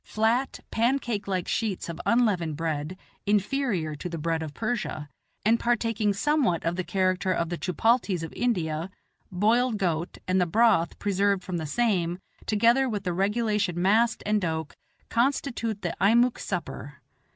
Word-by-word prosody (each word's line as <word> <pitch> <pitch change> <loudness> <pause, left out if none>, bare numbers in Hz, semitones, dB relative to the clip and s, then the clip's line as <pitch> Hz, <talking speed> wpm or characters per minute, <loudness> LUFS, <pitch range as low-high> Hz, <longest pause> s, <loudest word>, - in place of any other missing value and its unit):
Flat, 230 +5 0
pancake 235 -3 0
like 185 -2 -1
sheets 215 -5 -1
of 170 0 -6
unleavened 195 -10 +2
bread, 160 +1 -3 0.3
inferior 205 - 0
to 180 - -5
the 165 - -4
bread 165 +1 -1
of 155 -2 -6
Persia, 220 -10 -3 0.4
and 230 +2 +4
partaking 230 -3 +1
somewhat 250 - +1
of 165 +1 0
the 185 - -2
character 185 +1 0
of 170 -2 0
the 175 - -3
chupalties 190 -1 +1
of 165 - -6
India, 170 -8 -1 0.4
boiled 220 +5 +2
goat, 170 -4 -1
and 185 0 +2
the 180 - +2
broth 215 -3 +3
preserved 200 -1 +1
from 180 -2 -3
the 160 -2 -4
same, 180 -3 +1 0.3
together 235 +5 +3
with 205 -3 -3
the 180 -2 -1
regulation 205 -1 0
mast 220 +5 +2
and 210 0 +1
doke, 160 -3 -3 0.4
constitute 235 -4 0
the 175 - -2
Eimuek 235 +5 +4
supper. 165 -6 -5
200 Hz, 150 wpm, -26 LUFS, 170-230 Hz, 0.4 s, and